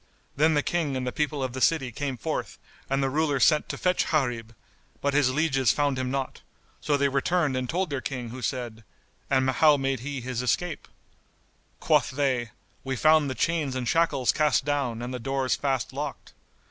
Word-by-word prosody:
Then 155 +2 +3
the 145 - +2
King 155 -6 -1
and 130 - -3
the 125 - -2
people 150 0 -1
of 130 -2 -3
the 130 - -5
city 135 -5 +2
came 135 +2 -4
forth 105 - -4 0.3
and 135 0 +1
the 135 - +1
Ruler 145 -1 +1
sent 150 +4 +3
to - - -4
fetch 180 0 +1
Gharib; 120 -7 -1 0.4
but 140 0 0
his 145 -3 +3
lieges 135 -4 +2
found 145 -3 0
him 130 0 -2
not; 135 0 -3 0.4
so 145 -1 +1
they 140 0 +2
returned 140 +2 +1
and 130 -1 -2
told 180 -1 -1
their 140 -2 -2
King 125 -4 -4
who 125 +2 -8
said, 120 -3 -4 0.5
"And 130 -1 +2
how 145 +3 +5
made 135 -1 -1
he 140 +2 -5
his 125 -1 -3
escape?" 160 +6 -1 0.9
Quoth - - +2
they, 130 -4 0 0.3
"We 135 0 -2
found 155 +2 +4
the 130 - -3
chains 150 0 0
and 125 -2 -3
shackles 150 -6 +2
cast 150 -3 +2
down 135 -6 -1
and 125 +1 -5
the 125 - -4
doors 135 -1 -1
fast 135 -1 -2
locked." 145 +1 -6
135 Hz, 195 wpm, -26 LUFS, 130-150 Hz, 0.9 s, how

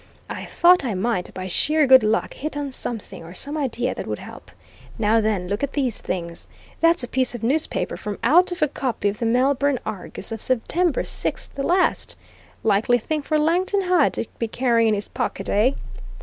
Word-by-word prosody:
I - - -5
thought 355 -1 +4
I 235 -6 -2
might, 185 -1 -1
by 185 - -5
sheer 300 - +2
good 260 -1 +8
luck, 215 +1 0
hit 300 +1 -5
on 285 -2 -3
something, 220 -8 -6
or 170 +2 -11
some 285 +9 -1
idea 255 -4 -1
that - - -6
would - - -3
help. - - -11 0.5
Now 225 0 +3
then, 210 -4 -1
look 200 +2 -2
at 280 -1 -2
these 260 -6 -1
things. 170 -2 -4 0.3
That's 330 -3 +3
a - - -3
piece 255 -1 0
of 235 - -7
newspaper 290 +7 0
from 210 -1 -5
out 345 +9 +5
of 355 -2 -1
a - - +4
copy 250 -7 -2
of 205 - -6
the 230 - 0
Melbourne 270 +3 +2
Argus 195 +2 -6
of 225 -1 -5
September 310 +7 0
6th - - -3
last. 360 +5 +1 0.5
Likely 225 +3 +3
thing 305 +6 -2
for 305 +2 0
Langton 360 +6 +1
Hyde 360 -5 +3
to - - -3
be 230 - -1
carrying 235 -1 +2
in 215 - +3
his 205 - -3
pocket, - - -3
eh?" 225 +7 +3
250 Hz, 195 wpm, -22 LUFS, 215-300 Hz, 0.5 s, good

